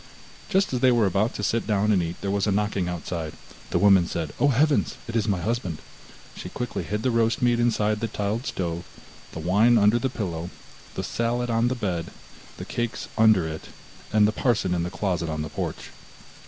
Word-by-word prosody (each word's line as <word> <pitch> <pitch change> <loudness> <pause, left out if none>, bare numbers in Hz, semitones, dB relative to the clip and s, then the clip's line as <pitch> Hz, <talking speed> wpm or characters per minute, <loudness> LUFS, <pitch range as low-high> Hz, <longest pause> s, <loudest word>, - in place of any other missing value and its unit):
Just 195 -6 +2
as 125 - +1
they 130 0 +5
were 120 -3 +3
about 100 +4 +1
to 105 - -4
sit 115 +3 0
down 105 0 +2
and 95 -4 +3
eat, 85 0 -3
there 100 - -2
was 100 +1 0
a - - +2
knocking 100 -3 0
outside. 85 -2 -4 0.4
The - - +1
woman 95 -4 +5
said: 80 -4 -4
'Oh, 145 - +4
heavens! 145 +3 +2
It 115 - -5
is 115 -2 +1
my 100 -4 +1
husband!' 95 -4 -2 0.6
she - - -7
quickly 125 -1 -4
hid 105 +1 -3
the 130 - +2
roast 115 +2 +1
meat 120 -1 +3
inside 110 -3 +1
the 115 - -1
tiled 105 +3 -2
stove, 85 -2 -3 0.5
the - - -7
wine 105 +8 +4
under 105 +2 +4
the 130 - 0
pillow, 85 -8 -4 0.5
the - - -3
salad 120 +1 -1
on 115 +1 +2
the 125 - 0
bed, 90 -8 -2 0.5
the - - -6
cakes 120 -1 -3
under 110 -7 +5
it, 80 0 -7 0.4
and 105 -1 +5
the - - +1
parson 110 -5 +1
in 85 - 0
the 85 - -2
closet 90 -3 -2
on 75 -1 -2
the 75 - -5
porch. - - -5
105 Hz, 210 wpm, -25 LUFS, 90-115 Hz, 0.6 s, they